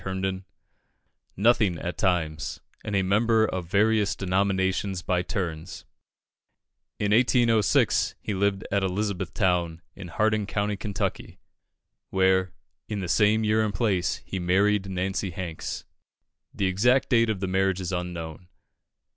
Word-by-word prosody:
Herndon, 95 Hz, 0 st, -3 dB, 0.9 s
"nothing 105 Hz, -4 st, +3 dB
at 85 Hz, +2 st, -4 dB
times, 80 Hz, -5 st, -1 dB, 0.2 s
and 105 Hz, -, -3 dB
a 95 Hz, -, +2 dB
member 110 Hz, +3 st, +3 dB
of 90 Hz, -5 st, -4 dB
various 105 Hz, +2 st, +2 dB
denominations 95 Hz, 0 st, 0 dB
by 90 Hz, -2 st, +1 dB
turns." 90 Hz, -2 st, -5 dB, 1.1 s
In 105 Hz, 0 st, +1 dB
1806, 115 Hz, -2 st, +3 dB
he 105 Hz, -, -4 dB
lived 100 Hz, 0 st, 0 dB
at 100 Hz, 0 st, +2 dB
Elizabethtown, 90 Hz, -3 st, -1 dB, 0.2 s
in 100 Hz, -3 st, -8 dB
Hardin 105 Hz, +3 st, 0 dB
County, 105 Hz, 0 st, -1 dB
Kentucky, 100 Hz, 0 st, -4 dB, 0.7 s
where, 95 Hz, -1 st, +2 dB, 0.4 s
in 105 Hz, -2 st, -3 dB
the 90 Hz, -, -4 dB
same 105 Hz, +5 st, +3 dB
year 110 Hz, +1 st, +2 dB
and 105 Hz, -2 st, -2 dB
place, 100 Hz, -7 st, 0 dB
he 95 Hz, -, -4 dB
married 95 Hz, +2 st, +2 dB
Nancy 95 Hz, +1 st, -2 dB
Hanks: 85 Hz, -2 st, -5 dB, 0.7 s
the 100 Hz, -, -2 dB
exact 120 Hz, +8 st, +2 dB
date 115 Hz, -2 st, +3 dB
of 105 Hz, -3 st, -1 dB
the 95 Hz, -, -2 dB
marriage 95 Hz, 0 st, +1 dB
is 90 Hz, -1 st, -4 dB
unknown. 90 Hz, -1 st, -5 dB
95 Hz, 130 wpm, -26 LUFS, 90-105 Hz, 1.1 s, nothing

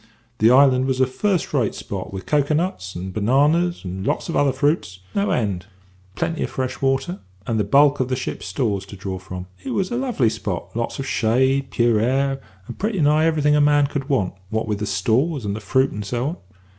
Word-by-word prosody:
"The 110 Hz, -, +5 dB
island 130 Hz, 0 st, +5 dB
was 130 Hz, -1 st, 0 dB
a 130 Hz, -, +5 dB
first 180 Hz, +8 st, -1 dB
rate 125 Hz, -7 st, +1 dB
spot, 95 Hz, -2 st, -6 dB
with 95 Hz, -1 st, -6 dB
cocoa 150 Hz, 0 st, +2 dB
nuts 155 Hz, -, -2 dB
and 95 Hz, +2 st, -5 dB
bananas, 145 Hz, -, +2 dB
and 95 Hz, +1 st, -5 dB
lots -, -, -1 dB
of -, -, -2 dB
other 140 Hz, -1 st, +3 dB
fruits, 135 Hz, -, 0 dB, 0.2 s
no 200 Hz, 0 st, +1 dB
end; 100 Hz, -6 st, -1 dB, 0.5 s
plenty 165 Hz, +9 st, -2 dB
of -, -, -1 dB
fresh 130 Hz, -1 st, -4 dB
water, 135 Hz, +7 st, 0 dB, 0.3 s
and 115 Hz, -2 st, -1 dB
the -, -, +2 dB
bulk 140 Hz, +7 st, +4 dB
of 130 Hz, -, +1 dB
the 130 Hz, -, -1 dB
ship's 130 Hz, -, -5 dB
stores 105 Hz, -8 st, -1 dB
to -, -, -9 dB
draw 95 Hz, -1 st, -5 dB
from. 90 Hz, -1 st, -7 dB, 0.2 s
It -, -, -3 dB
was 190 Hz, +2 st, 0 dB
a 240 Hz, -, -1 dB
lovely 245 Hz, -, +1 dB
spot; 100 Hz, -4 st, -5 dB
lots 115 Hz, 0 st, -2 dB
of 135 Hz, -, -4 dB
shade, 130 Hz, +3 st, +1 dB
pure 120 Hz, -3 st, +2 dB
air, 135 Hz, +4 st, +1 dB, 0.2 s
and 120 Hz, -, -9 dB
pretty 210 Hz, -1 st, -1 dB
nigh 155 Hz, +1 st, +4 dB
everything 150 Hz, -2 st, +3 dB
a 150 Hz, -, +4 dB
man 145 Hz, 0 st, +4 dB
could 140 Hz, 0 st, -4 dB
want, 105 Hz, -10 st, +1 dB, 0.2 s
what 110 Hz, +1 st, -2 dB
with 105 Hz, -2 st, -1 dB
the 105 Hz, -, -2 dB
stores, 115 Hz, -, +1 dB
and 100 Hz, 0 st, -2 dB
the -, -, -4 dB
fruit, 130 Hz, +6 st, +1 dB
and 105 Hz, -, -5 dB
so 120 Hz, +5 st, -2 dB
on. 170 Hz, -, -6 dB
130 Hz, 220 wpm, -22 LUFS, 105-145 Hz, 0.5 s, The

